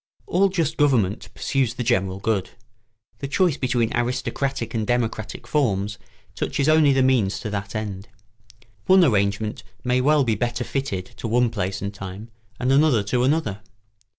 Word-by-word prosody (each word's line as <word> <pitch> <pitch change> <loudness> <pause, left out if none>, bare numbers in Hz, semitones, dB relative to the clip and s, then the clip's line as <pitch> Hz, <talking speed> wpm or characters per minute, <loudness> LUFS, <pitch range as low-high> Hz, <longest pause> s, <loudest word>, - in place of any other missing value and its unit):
] - - -38
All 195 +3 +2
just 170 -6 -1
government 120 -9 +2
pursues 135 -4 0
the 120 - -3
general 95 -5 +1
good; 100 -2 -1 0.7
the 140 - -4
choice 170 +2 +2
between 120 -4 0
aristocratic 125 0 -2
and 110 -2 -1
democratic 115 -3 -2
forms 105 -8 0 0.3
touches 140 - -1
only 155 -2 +5
the 135 -1 +3
means 110 -7 +2
to 110 - -4
that 100 +1 -4
end. 100 -2 -4 0.8
One 190 0 +7
arrangement 105 -4 +1 0.2
may 125 0 +2
well 150 +2 +4
be 115 -3 +1
better 120 +3 -1
fitted 120 -9 -3
to - - -4
one 120 +1 +2
place 95 -3 -3
and 100 0 -3
time, 100 +3 -8 0.3
and 125 +1 +1
another 135 -6 +4
to 120 +5 0
another. 130 -8 0
120 Hz, 160 wpm, -23 LUFS, 100-135 Hz, 0.8 s, One